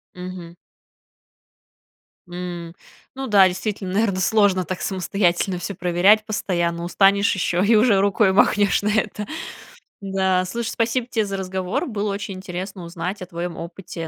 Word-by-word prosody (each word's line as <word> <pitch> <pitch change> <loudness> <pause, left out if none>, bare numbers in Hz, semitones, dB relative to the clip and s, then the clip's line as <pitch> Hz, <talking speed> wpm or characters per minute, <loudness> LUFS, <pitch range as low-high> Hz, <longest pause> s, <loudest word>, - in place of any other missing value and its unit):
Мгм. 180 -2 -8 1.7
М, 175 -1 -6 0.4
ну 270 0 -4
да, 200 -4 +6
действительно, 185 +1 -4
наверно, 200 -2 +1
сложно 195 -2 +3
так 185 +1 -5
самостоятельно 185 -1 0
всё 200 +2 -5
проверять 180 +5 +3
постоянно, 170 -5 -1
устанешь 200 +3 +3
еще, 180 -1 0
и 225 +2 +5
уже 215 -2 +4
рукой 195 0 +3
махнешь 200 0 +3
на 205 - 0
это. 210 -1 -1 0.8
Да, 190 -2 +1
слушай, 230 +4 -3
спасибо 235 +1 -1
те 220 -3 0
за 195 -1 -4
разговор. 190 - -2
Было 210 -4 -2
очень 200 0 -5
интересно 185 0 -6
узнать 175 +3 -5
о - - -5
твоем 175 -1 -5
опыте 170 -1 -7
190 Hz, 140 wpm, -22 LUFS, 180-205 Hz, 1.7 s, да